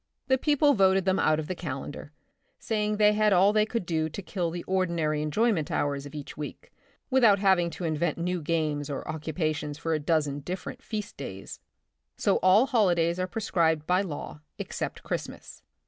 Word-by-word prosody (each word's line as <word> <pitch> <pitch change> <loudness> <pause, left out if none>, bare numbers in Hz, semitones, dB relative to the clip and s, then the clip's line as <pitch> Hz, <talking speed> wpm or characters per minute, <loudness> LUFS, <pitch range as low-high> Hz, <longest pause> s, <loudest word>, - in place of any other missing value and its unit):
The 260 0 +3
people 290 0 +3
voted 190 -3 +3
them 190 0 +2
out 155 0 +3
of 155 - -3
the 185 - -2
calendar, 145 -3 -6 0.5
saying 210 -1 -1
they 210 0 +5
had 210 0 +3
all 190 +3 +5
they 215 0 +3
could 230 -4 -3
do 160 -2 -1
to 180 - -6
kill 180 -3 -2
the 175 +1 -5
ordinary 170 -5 0
enjoyment 165 +2 +1
hours 140 -1 -1
of 145 - -12
each 145 -2 -7
week 150 -1 -8 0.4
without 235 -6 +5
having 190 -3 +3
to 175 - -8
invent 165 +1 0
new 175 +1 -2
games 150 -2 -1
or 140 - -5
occupations 155 -1 -3
for 165 +1 -2
a 155 - +1
dozen 150 -2 0
different 180 +6 -6
feast 210 -2 -5
days. 95 -8 -8 0.6
So - - +2
all 190 +6 +5
holidays 180 -9 +2
are 185 - 0
prescribed 170 -6 0
by 180 +3 +2
law 155 -4 -6 0.2
except - - -5
Christmas. - - -6
170 Hz, 180 wpm, -27 LUFS, 155-200 Hz, 0.6 s, they